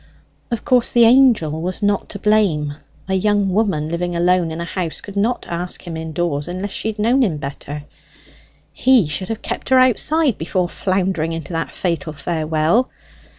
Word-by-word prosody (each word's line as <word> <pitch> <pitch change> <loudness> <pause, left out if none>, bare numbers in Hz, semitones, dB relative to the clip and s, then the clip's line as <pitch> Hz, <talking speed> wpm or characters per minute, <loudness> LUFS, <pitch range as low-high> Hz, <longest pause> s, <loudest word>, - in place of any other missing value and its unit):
Of 235 -3 -3
course 250 -2 +3
the 240 - +5
Angel 225 - +4
was 185 +4 -4
not 205 -1 0
to 200 - -6
blame 195 -9 +1 0.3
a 190 - -1
young 205 +1 +2
woman 190 -8 +1
living 175 +1 -2
alone 175 0 +2
in 160 +1 -5
a 170 - -3
house 170 -2 -3
could 200 - -10
not 220 +5 0
ask 175 +2 -4
him 170 -2 -6
indoors 160 -2 -2
unless 185 +3 -4
she - - -4
had 220 -1 -3
known 235 +6 +2
him 185 -11 +1
better 145 +1 -6 0.9
he 250 - +4
should 165 +6 -3
have 225 -1 -4
kept - - -4
her 260 - +5
outside 255 +2 +3
before 175 +2 -1
floundering 185 -4 -1
into 165 -1 -6
that 165 0 -2
fatal 165 -3 -2
farewell. 160 - 0
185 Hz, 175 wpm, -19 LUFS, 160-215 Hz, 0.9 s, the